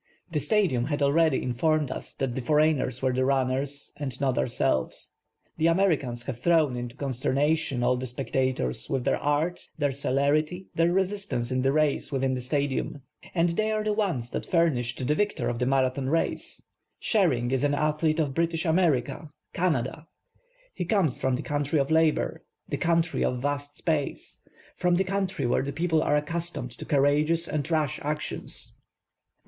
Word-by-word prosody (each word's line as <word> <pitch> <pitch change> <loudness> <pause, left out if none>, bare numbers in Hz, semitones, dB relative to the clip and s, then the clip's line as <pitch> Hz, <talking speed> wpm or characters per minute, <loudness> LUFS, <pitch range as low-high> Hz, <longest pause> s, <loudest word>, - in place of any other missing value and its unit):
The 155 - 0
Stadium 160 - +2
had 145 0 -1
already 155 0 +3
informed 145 +3 +1
us - - -6
that 135 -3 -2
the 130 - -3
foreigners 150 -2 +2
were 130 -1 +2
the 130 +1 +1
runners 135 +1 -1
and 130 -4 -4
not 135 -3 +1
ourselves. 90 - 0 0.5
The 160 +1 +3
Americans 160 -9 +1
have 120 -2 -5
thrown 155 -3 +3
into 120 -1 -5
consternation 140 +1 0
all 125 +1 +3
the 130 +1 -4
spectators 125 - -1
v/ith 130 -2 -1
their 135 - +1
art, 150 +4 0 0.2
their 145 -2 +1
celerity, 145 +6 0
their 165 +1 +2
resistance 190 -10 -1
in 130 0 +1
the 135 +1 +2
race 155 0 +1
within 135 -1 0
the 125 - -2
Stadium. 140 +1 -2 0.3
And 170 0 +3
they 215 +6 0
are 215 0 0
the 210 0 +1
ones 175 - -1
that - - -3
furnished 130 -8 +1
the 150 - +2
victor 205 +6 0
of 120 -1 -3
the 125 - +1
Marathon 130 0 +1
Race. 165 +2 -1 0.4
Sherring 135 - +2
is 135 0 +1
an 145 0 +2
athlete 155 +1 +1
of 145 -4 0
British 165 +2 0
America, 160 -3 +1 0.2
Canada. 155 -3 -1 0.7
He - - -3
comes 175 - +1
from 130 -1 +2
the" - - -4
country 145 +1 0
of 140 +2 0
labor, 160 -1 +2 0.2
the - - -2
country 165 0 +1
of 125 - 0
vast 145 0 -2
space, 155 -4 -2 0.3
from 180 -1 +2
the 190 - +2
country 190 -5 -2
where 120 - +2
the 140 +1 -3
people 160 +1 +1
are 150 - +2
accustomed 165 -4 -3
to - - -6
courageous 150 +3 +2
and 150 0 -2
rash 155 -4 0
actions. 150 +1 -3
The - - -39
145 Hz, 170 wpm, -27 LUFS, 130-165 Hz, 0.7 s, already